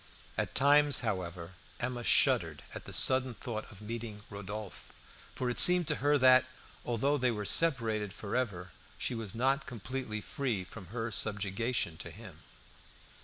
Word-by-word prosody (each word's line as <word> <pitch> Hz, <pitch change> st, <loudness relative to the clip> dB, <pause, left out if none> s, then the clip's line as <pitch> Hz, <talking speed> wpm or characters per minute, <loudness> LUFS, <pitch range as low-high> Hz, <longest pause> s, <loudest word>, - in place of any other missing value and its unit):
At -, -, -3 dB
times, 145 Hz, +1 st, +4 dB
however, 90 Hz, -6 st, -4 dB, 0.3 s
Emma 125 Hz, -1 st, -3 dB
shuddered -, -, +2 dB
at -, -, -8 dB
the -, -, -9 dB
sudden 130 Hz, -2 st, +5 dB
thought 110 Hz, -2 st, -6 dB
of 100 Hz, 0 st, -13 dB
meeting 110 Hz, -1 st, -6 dB
Rodolphe, 100 Hz, 0 st, -8 dB, 0.4 s
for 125 Hz, -, -3 dB
it 125 Hz, -, +1 dB
seemed 180 Hz, -2 st, +7 dB
to -, -, 0 dB
her 145 Hz, +2 st, +2 dB
that, 130 Hz, -1 st, +6 dB, 0.4 s
although 135 Hz, +5 st, 0 dB
they 125 Hz, 0 st, +2 dB
were 105 Hz, -3 st, -3 dB
separated 115 Hz, -9 st, +2 dB
forever, 100 Hz, -4 st, -4 dB, 0.3 s
she -, -, -1 dB
was 115 Hz, -4 st, -4 dB
not 135 Hz, +4 st, 0 dB
completely 120 Hz, 0 st, -5 dB
free 115 Hz, -3 st, -3 dB
from 95 Hz, 0 st, -11 dB
her 115 Hz, +4 st, -4 dB
subjugation 105 Hz, -2 st, -1 dB
to -, -, -7 dB
him. -, -, -12 dB
115 Hz, 150 wpm, -31 LUFS, 105-130 Hz, 0.4 s, seemed